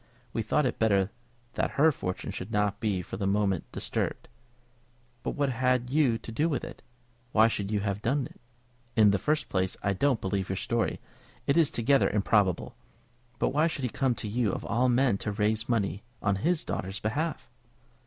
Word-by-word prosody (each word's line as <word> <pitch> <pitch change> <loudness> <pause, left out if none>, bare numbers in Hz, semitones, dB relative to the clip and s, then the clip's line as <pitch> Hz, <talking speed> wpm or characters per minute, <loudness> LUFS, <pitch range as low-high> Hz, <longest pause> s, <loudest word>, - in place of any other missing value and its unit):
We 115 - 0
thought 145 +7 +1
it 125 - -1
better 100 -3 +3 0.4
that - - -2
her 160 +2 +7
fortune 90 -9 -4
should 95 +4 -6
not 105 -1 +1
be 100 -5 0
for - - -7
the 100 -1 -1
moment 100 -2 0
disturbed." - - -3 0.9
"But - - -3
what 145 -2 +1
had 125 0 +1
you 135 -6 +3
to 115 - -9
do 150 +9 +1
with 140 -6 -1
it? - - -8 0.5
Why 110 +1 +6
should 100 -3 -2
you 105 -1 0
have 100 0 -2
done 135 +4 +1
it? - - -14 0.5
In 105 -3 +6
the 100 - +1
first 150 +6 0
place, 95 -1 -1
I 100 - +2
don't 130 +3 +2
believe 95 0 -2
your 95 - -1
story; 115 +4 -1 0.5
it 140 - +2
is 165 -4 +4
altogether 135 0 +3
improbable. 100 -3 +1 0.6
But - - +1
why 150 +4 +3
should 150 -4 -4
he 125 - 0
come 130 +1 0
to 110 - -5
you 110 -1 +1
of - - -5
all 125 +3 +2
men 125 -4 +3
to 105 - -2
raise 110 +3 0
money 105 -4 0 0.2
on 100 -1 +1
his 165 - +1
daughter's 95 +2 -4
behalf?" 150 +10 -2
110 Hz, 195 wpm, -28 LUFS, 100-130 Hz, 0.9 s, her